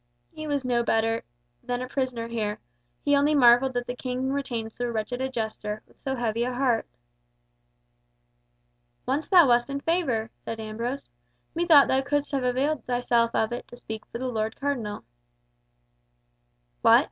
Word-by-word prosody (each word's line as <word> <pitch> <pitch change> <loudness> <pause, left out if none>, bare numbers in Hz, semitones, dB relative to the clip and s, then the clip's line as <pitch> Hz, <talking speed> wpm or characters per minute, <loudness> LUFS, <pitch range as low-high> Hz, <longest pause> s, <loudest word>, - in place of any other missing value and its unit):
He 310 0 -7
was 285 -3 -1
no 240 -1 +2
better 225 0 +1 0.4
than 245 0 -2
a 255 - -4
prisoner 255 -3 -2
here, 215 -3 -2 0.5
he 285 - +4
only 290 +2 +3
marvelled 255 0 +6
that 245 0 -1
the 245 - -4
King 255 +1 -2
retained 240 -6 -3
so 245 - -3
wretched 235 +2 -3
a 265 - -1
jester, 215 -3 -4
with - - -24
so 265 -1 -2
heavy 230 -2 -1
a 250 - -1
heart. 245 -3 +1 2.2
"Once 275 +4 -1
thou 355 -6 +7
wast 240 +1 +3
in 280 0 -2
favour," 275 -10 0
said 225 - -5
Ambrose. 230 - -4 0.4
"Methought 330 -4 +6
thou 265 - +2
couldst 290 +1 -1
have 275 -2 0
availed 265 +4 0
thyself 245 -1 +2
of 220 - +1
it 240 - -6
to - - -12
speak 220 -3 -7
for - - -6
the 255 - -4
Lord 220 -2 -2
Cardinal." 240 - -3 1.8
"What? 230 +1 +7
245 Hz, 160 wpm, -26 LUFS, 230-275 Hz, 2.2 s, thou